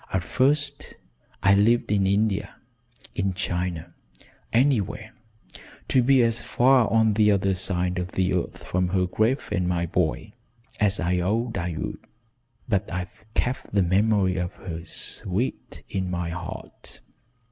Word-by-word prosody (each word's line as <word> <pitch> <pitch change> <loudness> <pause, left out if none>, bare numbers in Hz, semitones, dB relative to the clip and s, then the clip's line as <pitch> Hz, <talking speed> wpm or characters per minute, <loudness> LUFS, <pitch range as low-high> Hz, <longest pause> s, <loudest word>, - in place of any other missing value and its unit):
At 95 -2 0
first 140 +8 0 0.5
I 100 - +6
lived 110 +3 +3
in 100 -2 +2
India 100 0 0 0.6
in 95 -1 -1
China 90 -3 -3 0.6
anywhere 110 -4 +1 0.8
to 130 - +4
be 130 0 +4
as 115 0 +1
far 125 -1 +3
on 110 -1 +4
the 105 0 +4
other 95 -1 +2
side 90 -1 0
of 90 0 -5
the 95 0 +1
earth 90 - -3
from 90 0 0
her 90 0 +1
grave 110 +9 0
and 90 -3 0
my 85 -1 0
boy, 90 +4 -1 0.5
as 105 -1 +2
I 90 +2 +1
vowed 110 +6 -1
I 85 -1 -3
would, - - -4 0.7
but 100 -4 0
I've 95 +4 -6
kept 125 -4 -2
the 100 - +4
memory 95 0 +2
of 90 -1 -2
her 85 -3 -7
sweet 100 +7 -3
in 95 -2 -3
my 90 -2 -2
heart. 85 0 -8
95 Hz, 145 wpm, -25 LUFS, 90-110 Hz, 0.8 s, I